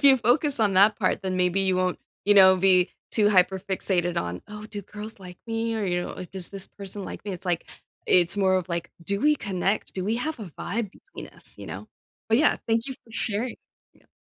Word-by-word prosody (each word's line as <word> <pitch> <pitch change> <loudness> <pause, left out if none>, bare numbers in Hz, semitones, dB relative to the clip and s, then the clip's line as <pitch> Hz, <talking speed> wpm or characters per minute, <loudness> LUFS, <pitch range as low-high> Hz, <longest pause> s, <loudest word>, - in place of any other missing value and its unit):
if - - -7
you 275 -1 +8
focus 270 +5 +3
on 210 -3 +2
that 205 +3 +6
part, - - 0
then 185 -1 -2
maybe 180 +1 +2
you 190 -1 +2
won't, 185 -1 0 0.3
you 205 - +5
know, 190 -1 +8
be 185 -1 +4 0.2
too 210 -2 +4
hyper 190 -1 +3
fixated 185 -3 -1
on, 90 +1 -5
"Oh, 210 0 -8
do 205 -2 -7
girls 210 +2 -8
like 180 -2 -11
me?" 225 0 -1
or, 215 - -1
you 175 -1 0
know, - - -5
if, 180 - -9
"Does 190 -2 -2
this 195 -1 -6
person 200 0 -7
like - - -8
me?" 205 - -4
it's 185 +1 -6
like, 175 -2 -1 0.4
it's 175 +1 +3
more 190 -2 +3
of, 185 0 -2
like, 170 -1 -3
"Do 200 +4 -1
we 300 0 +4
connect? 195 -2 -2
Do 185 - -3
we 220 +3 0
have 300 +2 -3
a 210 - -6
vibe 200 +5 -4
between 390 - -12
us?" - - -12
You - - -9
know? - - -7 0.4
But, 225 +1 +4
yeah, 305 - +4
thank 230 +2 +1
you 265 - -5
for 225 - -18
sharing 225 +2 -2 0.4
Yeah. - - -27
200 Hz, 235 wpm, -25 LUFS, 185-225 Hz, 0.4 s, you